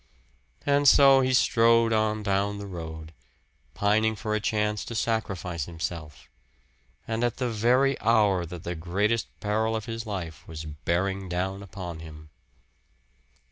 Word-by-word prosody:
And 145 0 +3
so 135 0 +7
he 130 0 +1
strode 115 -2 +4
on 110 -1 +1
down 100 0 0
the 100 - -6
road, 80 -3 -8 0.6
pining 110 +2 +2
for 105 0 -3
a 110 - +1
chance 105 0 -1
to 115 - -6
sacrifice 95 -9 -2
himself 80 -2 -6 0.8
and 115 +1 -1
at 120 -2 0
the 125 -2 -1
very 125 +5 +2
hour 105 -5 +3
that 85 0 -8
the 85 - -3
greatest 100 +7 0
peril 110 +2 0
of 110 -2 -4
his 115 0 -5
life 90 -6 -5
was 80 -1 -7
bearing 90 +5 -2
down 95 +2 -2
upon 90 -4 -7
him. 75 -1 -11
100 Hz, 140 wpm, -26 LUFS, 85-115 Hz, 0.8 s, so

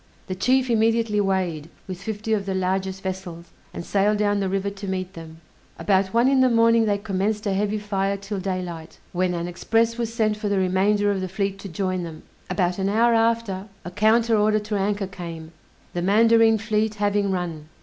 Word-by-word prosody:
The 185 - -4
chief 255 +7 +2
immediately 225 -1 +2
weighed, 180 -6 -1 0.2
with 185 -1 -6
fifty 220 +1 -3
of 200 -2 -1
the 190 - -1
largest 190 +1 -2
vessels, 185 -3 -6 0.2
and 170 - -7
sailed 205 +1 +2
down 205 -1 +1
the 195 -1 -1
river 195 +1 -1
to 200 0 -8
meet 185 0 -3
them. 165 -1 -11 0.4
About 195 -1 +2
one 235 +3 +3
in 270 -1 +4
the 255 - +5
morning 230 -1 +4
they 205 -1 +1
commenced 205 +1 -2
a 200 - 0
heavy 205 +2 0
fire 200 -1 -1
till 200 0 -5
daylight, 180 -4 -5
when 180 0 0
an 170 0 -3
express 225 +6 0
was 230 -1 -2
sent 215 -2 0
for 210 -1 -3
the 200 - +1
remainder 195 +2 +2
of 195 -2 -2
the 185 - -3
fleet 195 +1 -2
to 195 - -8
join 185 +1 -2
them: 165 -2 -8 0.3
about 180 0 0
an 195 0 0
hour 230 +3 +3
after 225 -4 0 0.2
a 175 - -6
counter 225 +4 +3
order 215 0 +3
to 210 0 -3
anchor 200 0 0
came, 170 -4 -8 0.4
the 175 - -2
mandarine 225 +3 +4
fleet 215 0 -1
having 205 -1 +1
run. 170 -5 -4
200 Hz, 200 wpm, -23 LUFS, 185-215 Hz, 0.4 s, the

